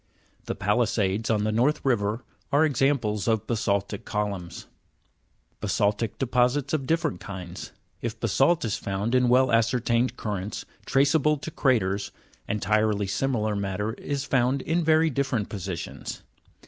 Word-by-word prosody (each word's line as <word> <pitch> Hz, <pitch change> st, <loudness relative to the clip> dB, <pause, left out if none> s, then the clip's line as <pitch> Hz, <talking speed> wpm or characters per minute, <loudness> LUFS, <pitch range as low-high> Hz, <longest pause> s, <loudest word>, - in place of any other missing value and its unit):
"The -, -, -3 dB
palisades" 105 Hz, 0 st, +1 dB
on 105 Hz, -2 st, +2 dB
the 110 Hz, -, +1 dB
North 130 Hz, +8 st, +1 dB
River 115 Hz, -2 st, +1 dB, 0.3 s
are 145 Hz, +2 st, +5 dB
examples 130 Hz, -8 st, +1 dB
of 110 Hz, -3 st, +1 dB
basa'ltic 100 Hz, -3 st, -1 dB
columns. 100 Hz, -5 st, -3 dB, 1.0 s
3. -, -, -4 dB
Basa'ltic 105 Hz, +1 st, 0 dB
deposits 125 Hz, +2 st, +1 dB
of 135 Hz, -4 st, -1 dB
different 160 Hz, -, 0 dB
kinds. 90 Hz, -1 st, -7 dB, 0.3 s
If 115 Hz, -1 st, -4 dB
basa'lt 135 Hz, -, +2 dB
is 105 Hz, -, -1 dB
found 100 Hz, +4 st, -2 dB
in 125 Hz, -1 st, +4 dB
well 130 Hz, +1 st, +4 dB
ascertained 115 Hz, +1 st, +2 dB
currents, 105 Hz, -1 st, -4 dB, 0.2 s
traceable 145 Hz, +2 st, +3 dB
to 155 Hz, +3 st, -7 dB
craters, 100 Hz, -9 st, +1 dB, 0.4 s
entirely 105 Hz, 0 st, +1 dB
similar 110 Hz, 0 st, 0 dB
matter 100 Hz, +2 st, -2 dB
is 140 Hz, +2 st, -4 dB
found 130 Hz, 0 st, +1 dB
in 165 Hz, +3 st, 0 dB
very 160 Hz, 0 st, +4 dB
different 130 Hz, -6 st, -1 dB
positions. 95 Hz, -4 st, -6 dB
115 Hz, 135 wpm, -26 LUFS, 100-135 Hz, 1.0 s, are